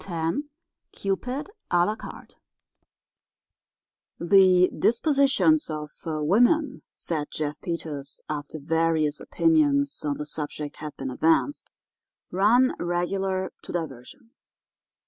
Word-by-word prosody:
X 165 -3 -2 0.6
CUPID 250 - -3 0.2
À 175 0 +4
LA 210 - -1
CARTE 220 - -11 1.8
"The 185 0 +5
dispositions 280 - +3
of 150 -1 -5
woman," 205 - +2
said 155 -3 -3
Jeff 150 -1 -4
Peters, 150 -5 -5
after 150 0 -5
various 160 0 +1
opinions 290 -3 +2
on 145 -1 -1
the 150 - -5
subject 150 -1 -5
had 150 -1 -8
been 130 -1 -4
advanced, 165 - +1 0.6
"run, 230 +7 +4
regular, 185 +2 -1
to - - -9
diversions. 170 - -8
175 Hz, 100 wpm, -25 LUFS, 155-235 Hz, 1.8 s, The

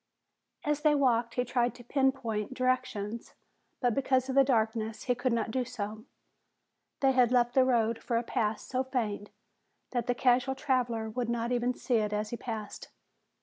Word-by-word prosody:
As 295 0 0
they 300 -1 +4
walked 240 -4 +2
he 250 - +1
tried 245 0 0
to 245 - -12
pinpoint 260 -4 0
directions, 255 -4 -2 0.5
but 245 -3 +2
because 260 0 +1
of - - -1
the 275 +1 +6
darkness 225 -3 0
he 250 - +1
could 245 +1 -1
not 230 -1 0
do 255 +2 0
so. 220 -3 -6 1.0
They 270 -1 +5
had 250 -2 +4
left 240 -1 +3
the 260 - +5
road 230 -3 +1
for 235 - -1
a 235 - 0
path 220 -3 -1
so 255 0 -2
faint 220 -6 -3 0.6
that 245 -1 -1
the 245 - +1
casual 255 +2 +2
traveler 245 -5 0
would 235 +2 -3
not 235 0 -1
even 245 0 +1
see 245 -3 0
it 210 -1 0
as 210 0 -2
he - - -2
passed. 220 -4 -6
245 Hz, 180 wpm, -30 LUFS, 225-255 Hz, 1.0 s, the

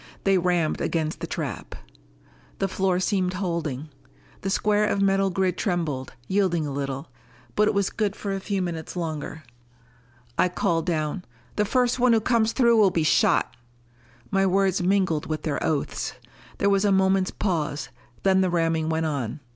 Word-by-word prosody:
They 195 -1 +3
rammed 175 -3 +1
against 160 -1 -1
the - - -4
trap. - - -5 0.8
The 195 - 0
floor 190 -1 0
seemed 185 -1 0
holding. 165 -6 -3 0.5
The 195 - -2
square 210 +1 +2
of 200 - 0
metal 195 0 +3
grid 185 0 0
trembled, 160 -9 -2
yielded 190 -4 +1
a 145 - -3
little. 135 -1 -4 0.5
But 210 0 +4
it - - +1
was 200 -2 +1
good 210 -2 -1
for 200 -1 -4
a 195 - -2
few 195 -1 -2
minutes 165 -2 -5
longer. 160 -2 -4 1.0
I 180 - +4
called 170 -1 0
down, 155 +1 -1 0.3
"The 210 - +2
first 250 +2 +1
one 245 -1 +5
who 225 - +5
comes 225 0 +2
through 235 -2 +4
will 205 -3 +6
be 165 -3 0
shot!" 155 - +3 0.8
My 195 -1 +3
words 190 0 +2
mingled 185 -4 +1
with 155 -1 -3
their 150 -3 -2
oaths. 150 -3 -1 0.4
There 200 - +2
was 195 0 +3
a 205 - +3
moment's 190 0 +3
pause, 155 -7 -2 0.3
then 190 -1 +4
the 185 - +2
ramming 165 -2 +1
went 160 0 0
on. 140 -3 -2
185 Hz, 170 wpm, -25 LUFS, 160-195 Hz, 1.0 s, will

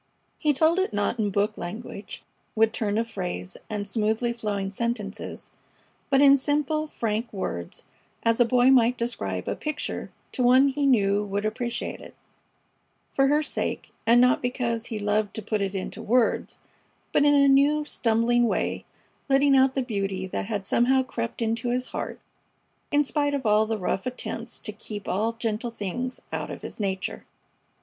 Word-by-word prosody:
He 300 - +3
told 315 +5 +3
it 380 - 0
not 205 +3 0
in 210 -2 +1
book 205 +2 0
language, 200 +2 -7 0.3
with 220 0 +4
turn 210 -2 -1
of 230 +1 0
phrase 180 - -4
and 205 -2 -3
smoothly 220 +3 0
flowing 205 -4 -3
sentences, 215 -1 -4 0.6
but 275 0 +4
in 280 -1 +7
simple, 300 +2 0
frank 225 -3 -2
words, 85 - -5 0.4
as 230 0 +2
a - - +8
boy 250 +2 +4
might 245 -1 +4
describe 100 - -3
a - - -1
picture 305 -1 -4 0.2
to - - -3
one 255 +3 +6
he 280 +1 0
knew 205 -5 +3
would 200 +1 -2
appreciate 235 +2 -3
it - - -12 1.0
for 270 0 +3
her 295 +2 +3
sake, - - -3 0.2
and 235 +1 +6
not 250 0 +4
because 240 -2 -2
he 225 - -4
loved 210 0 0
to 220 - -3
put 215 0 -1
it 195 0 -2
into 195 +3 -4
words; 235 +2 +1 0.5
but - - +3
in 290 0 +5
a 280 -1 +5
new, 285 +2 +4
stumbling 235 -1 +2
way - - -1 0.4
letting 275 +1 +5
out 265 0 +4
the 265 - +1
beauty 195 -5 -2
that 190 - -4
had 205 -3 -3
somehow 260 +5 +3
crept 230 -2 -4
into 230 +2 -1
his 250 +1 -1
heart - - -5 0.7
in 290 0 +4
spite 290 0 0
of 270 -3 -4
all 215 0 +4
the 225 0 -1
rough 190 +2 -2
attempts 235 -1 -5
to 215 - -5
keep 210 -1 -8
all 220 +5 0
gentle 230 0 -2
things 235 +4 -4
out - - -3
of - - -8
his - - -7
nature. 190 -2 -2
230 Hz, 170 wpm, -26 LUFS, 210-260 Hz, 1.0 s, a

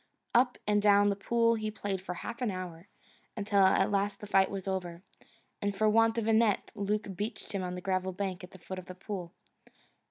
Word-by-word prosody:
Up 245 +1 +4
and 210 0 +3
down 205 0 +5
the 200 - +1
pool 230 +3 +2
he 215 -1 -2
played 205 -3 -3
for 180 -1 -5
half 235 +7 -6
an 245 - +1
hour, 180 -2 -6 0.5
until 205 -1 +1
at 190 +1 +4
last 200 0 0
the - - -8
fight 195 -2 +3
was 195 -1 -5
over, 180 -2 -3 0.6
and 205 -1 -1
for 215 +2 +3
want 225 +1 +4
of 230 - 0
a 225 - +4
net 220 -2 +2
Luke 205 -1 -2
beached 210 +4 -4
him 195 - -2
on 180 0 -3
the 180 - -6
gravel 190 -1 -1
bank 185 -1 -4
at 180 - -9
the 190 - -13
foot 185 +1 -7
of 185 - -12
the 185 - -8
pool. 185 -2 -6
200 Hz, 220 wpm, -31 LUFS, 185-210 Hz, 0.6 s, down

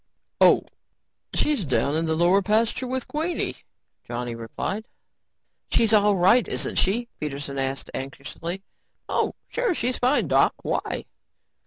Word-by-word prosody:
"Oh, - - +6 0.7
she's 295 -9 +1
down 135 0 +1
in 165 +1 +1
the 160 - +1
lower 175 +4 +4
pasture 220 +5 +1
with 260 0 -3
Queenie," 320 +4 -2 0.5
Johnny 120 0 -4
replied. 155 - -4 0.8
"She's 225 -1 +3
all 205 -1 +5
right, 190 +4 +5
isn't - - -2
she?" 230 +6 +1
Peterson 140 -2 -4
asked 135 0 -3
anxiously. 150 +7 -6 0.4
"Oh, - - 0
sure, 480 -7 0
she's 250 -1 -1
fine, 255 +4 +2
Doc. - - +4
Why?" - - -2
195 Hz, 130 wpm, -25 LUFS, -, 0.8 s, Oh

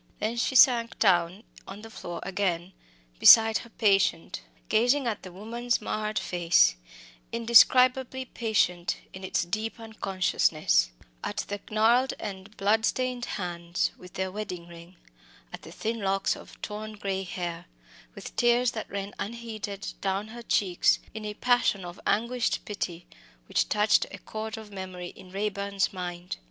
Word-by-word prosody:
Then 220 +3 -2
she 255 +2 0
sank 235 -2 +5
down 180 0 +2 0.2
on 200 +2 -9
the 225 - -10
floor 175 -5 -7
again 185 -2 -2 0.5
beside 225 -1 +8
her 235 - -12
patient, 195 - +1 0.3
gazing 250 +5 +3
at 225 -3 -2
the 185 - -10
woman's 235 +6 -2
marred 215 0 -3
face 170 - +3 0.6
indescribably 250 +3 +5
patient 210 -8 0 0.2
in 190 - -9
its 185 - 0
deep 215 +6 -3
unconsciousness 185 - +1 0.3
at - - -3
the 205 0 -4
gnarled 230 +5 +3
and 200 0 -7
bloodstained 240 +4 +1
hands, 175 -2 -2
with 180 0 -14
their 190 0 -2
wedding 185 -4 -6
ring; 170 +1 -13 0.6
at - - -7
the - - -12
thin 225 +1 -3
locks 195 0 +1
of - - -14
torn 215 +1 -5
grey 195 -2 -3
hair 175 -2 -5 0.5
with - - -9
tears 240 0 +3
that 220 - -6
ran 200 0 -5
unheeded 215 -2 -5
down 195 +2 -1
her 235 +2 -9
cheeks, 190 -5 +2 0.2
in 215 0 -6
a 210 0 -5
passion 240 -6 +2
of 175 0 -9
anguished 235 +2 0
pity, 180 -4 -5 0.4
which - - +1
touched 210 0 +3
a - - -8
chord 220 0 -6
of 220 -1 -10
memory 185 -2 -6
in 185 - -14
Raeburn's 200 0 -1
mind. 180 -1 -5
205 Hz, 145 wpm, -27 LUFS, 185-225 Hz, 0.6 s, beside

